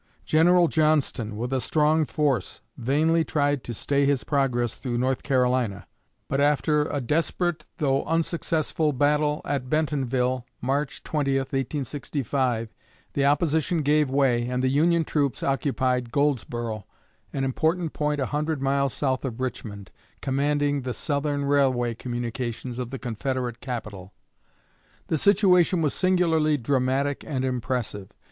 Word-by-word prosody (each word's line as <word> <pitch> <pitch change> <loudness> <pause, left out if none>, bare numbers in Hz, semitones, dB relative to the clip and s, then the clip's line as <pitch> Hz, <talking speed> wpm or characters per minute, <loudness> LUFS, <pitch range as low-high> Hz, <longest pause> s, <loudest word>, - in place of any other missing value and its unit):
General 175 +2 +5
Johnston, 150 -9 +1
with 120 +4 -3
a 130 - +1
strong 155 +4 +2
force, 140 - -1
vainly 155 +7 +2
tried 145 -3 0
to - - -5
stay 140 +5 0
his 140 -2 +1
progress 125 -5 0
through 120 -3 -3
North 130 +1 0
Carolina; 125 -6 +1 0.4
but 135 - 0
after 150 +1 +2
a 145 - -2
desperate 165 +5 -1
though 135 -2 +1
unsuccessful 160 -1 0
battle 150 +2 +1
at 135 -3 -2
Bentonville 130 -5 0 0.2
(March 140 +2 -2
20, 140 -3 0
1865), 135 -3 -2 0.4
the 140 - +1
opposition 155 +2 +1
gave 150 0 +3
way, 130 -3 +2
and 125 +1 -1
the 130 - +3
Union 165 +5 +3
troops 145 -4 -1
occupied 130 -3 0
Goldsboro, 120 -6 -1 0.4
an 135 - -2
important 160 +5 0
point 150 -1 -1
a 135 - +1
hundred 150 +2 -2
miles 140 0 0
south 130 -2 -1
of 130 -3 -4
Richmond, 105 -6 -5 0.3
commanding 145 +1 0
the 125 -2 -4
Southern 145 +1 -1
railway 130 -4 +2
communications 120 +1 -4
of 125 -2 -3
the 135 - -5
Confederate 125 0 -3
capital. 105 -7 -6 1.0
The 160 - +1
situation 180 -3 +4
was 150 - +1
singularly 165 -5 +2
dramatic 135 +2 0
and 130 -4 -2
impressive. 125 -5 -3
140 Hz, 130 wpm, -25 LUFS, 125-150 Hz, 1.0 s, General